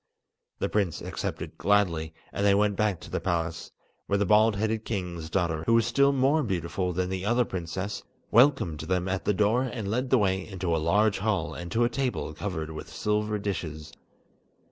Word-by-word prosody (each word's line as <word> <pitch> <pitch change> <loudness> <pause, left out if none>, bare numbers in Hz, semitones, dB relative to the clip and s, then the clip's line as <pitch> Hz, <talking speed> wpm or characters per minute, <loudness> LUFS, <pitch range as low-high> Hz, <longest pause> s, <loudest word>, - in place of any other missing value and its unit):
The - - -1
prince 100 -6 0
accepted - - -5
gladly, 90 -6 +2 0.2
and 100 - -2
they 100 -1 +5
went 105 0 +2
back 105 -4 0
to - - -11
the - - -1
palace, 85 -2 -2 0.4
where 100 - +2
the 100 - +1
bald 105 +2 +5
headed 110 +1 -1
king's 90 -7 -4
daughter, 85 -3 0
who 115 - +5
was 115 - +4
still 140 +4 +3
more 140 +3 +3
beautiful 90 - -2
than 90 +1 -1
the 95 0 -3
other 120 +4 +2
princess, 95 +3 -4 0.3
welcomed 120 - +4
them 90 +3 -1
at 95 0 -2
the 105 - +3
door 105 +5 +3
and 115 -6 -3
led 125 +3 -1
the 130 - +5
way 95 -3 +1
into 90 -4 -2
a 80 - 0
large 100 +6 +2
hall 100 -5 -1
and 85 0 -7
to 120 - +3
a 120 - +3
table 125 - -2
covered 80 -1 -4
with 80 - -8
silver 105 0 -1
dishes. 80 -7 -4
100 Hz, 190 wpm, -27 LUFS, 85-110 Hz, 0.4 s, they